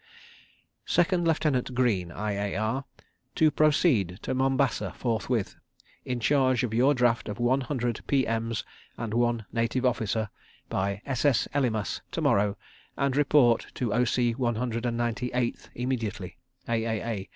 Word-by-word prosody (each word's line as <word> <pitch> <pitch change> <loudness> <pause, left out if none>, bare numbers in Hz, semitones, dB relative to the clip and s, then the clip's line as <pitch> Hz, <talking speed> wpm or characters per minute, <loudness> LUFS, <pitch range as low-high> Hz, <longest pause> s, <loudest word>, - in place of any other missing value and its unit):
_ - - -12
Second 175 0 +2
Lieutenant 140 -6 +1
Greene, 105 -9 +1
I.A.R., 105 +5 -2 0.5
to 155 -1 +4
proceed 145 - +3
to - - -2
Mombasa 135 +1 +1
forthwith 115 -2 -1 0.5
in 125 -1 -2
charge 130 +1 +2
of 115 -3 -2
your 130 +5 +4
draft 120 -2 +1
of 105 - -4
one 125 +3 +2
hundred 125 -3 -2
P.M.'s 115 -4 0 0.3
and 115 -2 -4
one 120 -2 +1
Native 115 +2 0
Officer, 110 -3 0 0.4
by 100 +1 -2
s.s. 135 -1 +1
Elymas 120 -7 0
to - - -2
morrow 100 0 +2 0.4
and 140 -1 +1
report 140 -5 +4
to 120 -5 -1
O.C., 120 0 +2
One 120 -1 -1
Hundred 115 0 -2
and 115 -1 -1
Ninety 120 +1 -1
Eighth 125 -1 -2
immediately. 115 -7 -3 0.3
_A.A.A. 115 -3 -2
120 Hz, 135 wpm, -27 LUFS, 110-130 Hz, 0.5 s, to